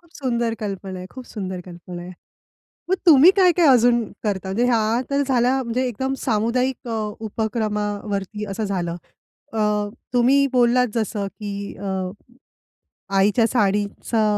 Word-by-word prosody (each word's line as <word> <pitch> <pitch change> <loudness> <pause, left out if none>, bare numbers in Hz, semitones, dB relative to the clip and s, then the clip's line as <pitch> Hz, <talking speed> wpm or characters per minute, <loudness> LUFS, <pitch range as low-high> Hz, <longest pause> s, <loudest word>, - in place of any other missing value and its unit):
खूप 340 -1 -26
सुंदर 235 -4 -1
कल्पना 195 -2 -5
आहे, 180 - -7
खूप 255 -1 -10
सुंदर 190 -4 -5
कल्पना 175 0 -9
आहे. 180 +1 -9 0.8
मग 375 - +3
तुम्ही 315 +1 +9
काय-काय 360 -3 +5
अजून 240 -2 +5 0.2
करता? 195 -3 -2
म्हणजे 210 +6 0
ह्या 230 -1 +2
तर 280 0 +2
झाल्या 255 0 +2
म्हणजे 250 +1 -1
एकदम 265 +3 -2
सामुदायिक 245 +3 0
अ, - - -3 0.3
उपक्रमावरती 210 -2 -2
असं 215 +3 -3
झालं. 175 -4 -2 0.6
अ, 225 - -3 0.5
तुम्ही 260 +3 +4
बोललात 250 0 +4
जसं 215 -3 -1
की 200 +1 -6
अ, 190 -2 -3 1.1
आईच्या 205 +4 +4
साडीचा 210 0 0
220 Hz, 135 wpm, -22 LUFS, 200-250 Hz, 1.1 s, तुम्ही